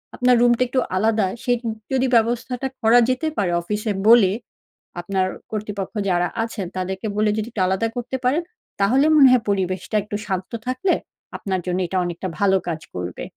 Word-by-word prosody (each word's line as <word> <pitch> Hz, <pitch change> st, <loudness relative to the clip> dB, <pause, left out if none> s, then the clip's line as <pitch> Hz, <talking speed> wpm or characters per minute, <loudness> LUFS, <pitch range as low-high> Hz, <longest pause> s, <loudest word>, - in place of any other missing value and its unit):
আপনার 250 Hz, 0 st, +4 dB
রুমটা 240 Hz, 0 st, +4 dB
একটু 255 Hz, +2 st, 0 dB, 0.2 s
আলাদা, 215 Hz, +1 st, +2 dB, 0.2 s
সে 245 Hz, -, 0 dB, 0.4 s
যদি 265 Hz, 0 st, +2 dB
ব্যবস্থাটা 240 Hz, +3 st, 0 dB
করা 230 Hz, +2 st, +6 dB
যেতে 255 Hz, +5 st, 0 dB
পারে 190 Hz, -4 st, +1 dB
অফিসে 210 Hz, +4 st, -2 dB, 0.2 s
বলে, 225 Hz, -5 st, +7 dB, 0.7 s
আপনার 190 Hz, 0 st, 0 dB, 0.2 s
কর্তৃপক্ষ 210 Hz, -2 st, -4 dB, 0.2 s
যারা 175 Hz, -1 st, +2 dB, 0.2 s
আছেন 225 Hz, -4 st, -4 dB
তাদেরকে 190 Hz, +3 st, -3 dB
বলে 215 Hz, 0 st, +2 dB
যদি 215 Hz, 0 st, -2 dB
একটু 220 Hz, -, -3 dB
আলাদা 190 Hz, +4 st, 0 dB
করতে 245 Hz, +2 st, -3 dB
পারেন 275 Hz, +7 st, +2 dB, 0.4 s
তাহলে 255 Hz, +8 st, +4 dB
মনে 275 Hz, -3 st, +8 dB
হয় 250 Hz, -3 st, +4 dB
পরিবেশটা 190 Hz, +1 st, -1 dB
একটু 210 Hz, 0 st, -6 dB
শান্ত 190 Hz, -2 st, -3 dB, 0.2 s
থাকলে 255 Hz, +9 st, +1 dB, 0.4 s
আপনার 190 Hz, -2 st, -2 dB
জন্য 180 Hz, 0 st, -1 dB
এটা 185 Hz, -, -2 dB
অনেকটা 175 Hz, +2 st, -4 dB
ভালো 195 Hz, -1 st, +4 dB
কাজ 160 Hz, -2 st, -3 dB
করবে। 90 Hz, -1 st, -5 dB
215 Hz, 165 wpm, -22 LUFS, 190-245 Hz, 0.7 s, মনে